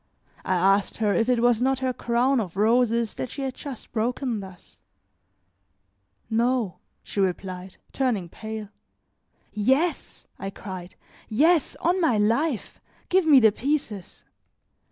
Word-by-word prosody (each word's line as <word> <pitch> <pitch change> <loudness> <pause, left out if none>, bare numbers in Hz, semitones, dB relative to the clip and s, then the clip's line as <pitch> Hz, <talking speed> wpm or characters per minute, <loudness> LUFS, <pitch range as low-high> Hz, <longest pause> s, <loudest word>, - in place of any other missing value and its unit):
I 185 - 0
asked 195 +2 +2
her 210 -3 +1
if 230 +3 +1
it 240 -2 +2
was 240 -1 +3
not 265 +1 +2
her 260 0 -1
crown 245 +3 +1
of 190 -4 -4
roses 230 +1 +2
that 255 - -5
she 275 - -5
had 265 -1 -2
just 270 -4 -9
broken 240 +1 -1
thus. 190 -2 -12 1.5
"No," 230 -3 0 0.2
she - - -5
replied, 185 -1 -2 0.2
turning 240 -10 0
pale. 220 +3 -7 0.8
"Yes," 265 +11 0
I 195 - -4
cried, 185 -2 -8 0.3
"yes, 310 +7 +3
on 360 +3 +2
my 300 -10 +3
life. 230 +5 0 0.3
Give 370 -2 +3
me 285 -4 +8
the 220 -3 +6
pieces." 230 - -3
230 Hz, 135 wpm, -25 LUFS, 205-265 Hz, 1.5 s, me